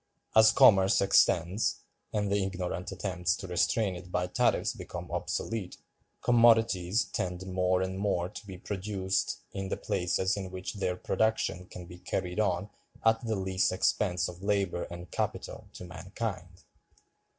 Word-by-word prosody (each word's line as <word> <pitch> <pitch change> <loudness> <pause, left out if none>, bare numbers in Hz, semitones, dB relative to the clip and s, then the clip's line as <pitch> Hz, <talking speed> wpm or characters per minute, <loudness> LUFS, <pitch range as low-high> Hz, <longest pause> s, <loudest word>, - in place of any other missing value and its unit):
As 110 0 +8
commerce 95 -4 +6
extends, 95 0 +3 0.3
and 105 -2 -1
the 100 -1 +2
ignorant 90 -1 -3
attempts 90 -3 -1
to 95 - -8
restrain 95 +3 +1
it 90 0 -10
by 90 0 0
tariffs 90 - +1
become - - -8
obsolete, 110 -5 -3 0.5
commodities 115 -4 +4
tend 90 0 -4
more 90 0 +1
and 95 0 -4
more 100 -4 0
to 100 +1 -10
be 95 -2 -8
produced 95 0 -2
in 95 -1 -4
the - - -2
places 95 -1 0
in 95 -2 -5
which 95 0 -5
their 95 -3 -1
production 90 -3 0
can 90 -1 -9
be 90 +1 -12
carried 90 +1 -3
on 95 -1 0 0.3
at 115 +1 +4
the 110 - 0
least 95 -1 +1
expense 90 -2 +1
of 90 0 -9
labor 100 -3 0
and 85 0 -9
capital - - -3
to 90 - -9
mankind. 90 0 -6
95 Hz, 150 wpm, -30 LUFS, 90-100 Hz, 0.5 s, As